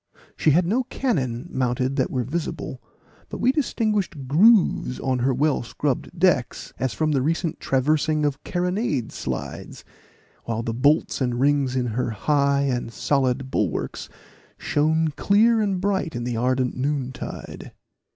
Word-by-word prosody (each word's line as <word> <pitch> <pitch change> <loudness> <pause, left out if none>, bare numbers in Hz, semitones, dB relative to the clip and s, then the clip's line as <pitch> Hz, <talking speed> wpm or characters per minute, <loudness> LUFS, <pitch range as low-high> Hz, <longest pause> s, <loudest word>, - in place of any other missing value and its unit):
She - - +2
had 170 +4 +4
no 220 +9 +1
cannon 130 - -2
mounted 130 +1 0
that 130 - +1
were 125 -2 -1
visible; 155 +7 -4 0.5
but - - -6
we 250 - +3
distinguished 210 - -1
grooves 180 - +4
on 130 -2 -1
her 130 +3 +2
well 145 +3 +1
scrubbed 140 +7 -3
decks, 170 -9 +1
as 130 -1 0
from 155 -1 +1
the 135 -3 +2
recent 165 +3 -1
traversing 150 +3 +1
of 145 -1 -2
carronade 180 - -1
slides, - - -6 0.6
while 115 0 -2
the 115 - -2
bolts 140 +5 +2
and 125 -2 0
rings 140 -1 +2
in 125 -1 0
her 125 +1 -1
high 140 +5 +1
and 125 -4 -1
solid 130 0 0
bulwarks 95 -8 -2 0.5
shone 160 +2 +1
clear 220 +8 +3
and 195 -3 0
bright 190 -6 -1
in 120 - -3
the 120 -1 -2
ardent 125 +2 0
noontide. 135 -1 -4
140 Hz, 145 wpm, -23 LUFS, 125-170 Hz, 0.6 s, had